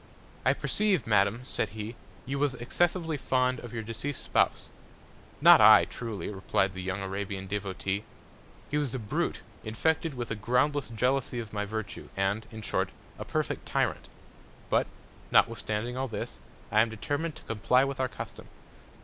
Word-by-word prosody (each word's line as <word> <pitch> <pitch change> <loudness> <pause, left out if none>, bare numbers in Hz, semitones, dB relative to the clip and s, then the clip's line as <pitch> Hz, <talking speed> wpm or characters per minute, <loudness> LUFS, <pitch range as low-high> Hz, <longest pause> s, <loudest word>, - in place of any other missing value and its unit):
I - - +4
perceive, 200 - +1
Madam, 105 +2 +3
said 110 - -2
he, 110 +2 -5 0.3
you 135 +2 -2
was 145 -3 +1
excessively 165 +5 0
fond 130 -2 +1
of 120 - -8
your 115 -2 -4
deceased 115 +5 -3
Spouse. - - +1 0.7
Not - - +9
I - - +9
truly, 115 -4 -5
reply'd 95 -1 0
the 95 - -5
young 95 +1 -3
Arabian 95 0 -4
Devotee. 100 0 -2 0.7
He 150 - +2
was 140 -4 -2
a - - 0
Brute, 105 -4 -2 0.2
infected 160 +7 0
with 120 -2 -4
a - - 0
groundless 125 +6 +1
Jealousy 125 +2 0
of 110 -3 -7
my 105 -1 -1
Virtue; 110 0 -5
and, 100 +3 0
in 110 -1 -8
short, - - 0 0.3
a - - -5
perfect - - -2
Tyrant. - - 0 0.6
But, - - +3 0.4
notwithstanding 115 +2 +2
all 135 +1 -1
this, 115 - -5 0.3
I 110 - +6
am 115 - +2
determin'd 145 +8 -2
to - - -12
comply 120 +4 +3
with 135 -1 -2
our 130 -1 +1
Custom. 105 - -8
115 Hz, 160 wpm, -29 LUFS, 105-135 Hz, 0.7 s, Not